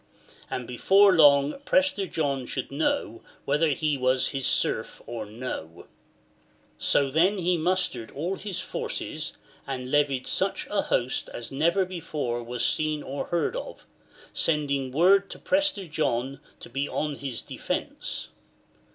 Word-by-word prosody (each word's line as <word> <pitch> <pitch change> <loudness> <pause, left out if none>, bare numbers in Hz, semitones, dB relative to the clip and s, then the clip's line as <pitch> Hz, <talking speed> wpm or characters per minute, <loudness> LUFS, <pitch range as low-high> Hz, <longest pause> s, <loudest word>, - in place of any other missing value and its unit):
And 125 -2 -4
before 195 +11 +5
long 145 - +5
Prester 280 -9 +2
John 140 -6 -1
should 130 - -4
know 135 -5 -1 0.2
whether 150 +3 +2
he 150 -1 0
were 130 +1 +3
his 135 0 +1
serf - - +1
or 115 -3 -5
no! 105 -8 -6 0.5
" - - -36
So 140 -2 +2
then 180 +8 +3
he 180 -1 +2
mustered 165 -9 0
all 170 +7 -3
his 195 -2 -5
forces, - - -4 0.3
and 130 -1 -4
levied 145 -3 +2
such 195 +1 0
a 205 -1 +2
host 125 +2 -1
as 120 - -5
never 170 +7 +2
before 155 -9 -3
was 120 0 -2
seen 155 -1 +1
or 140 +1 -4
heard 175 - 0
of, - - -7 0.5
sending 140 -4 0
word 190 +7 +4
to - - -7
Prester 290 -9 +1
John 135 -4 -1 0.2
to - - -8
be 140 +1 -2
on 150 -2 -2
his 135 -5 -4
defence. - - -4
145 Hz, 145 wpm, -27 LUFS, 130-180 Hz, 0.5 s, before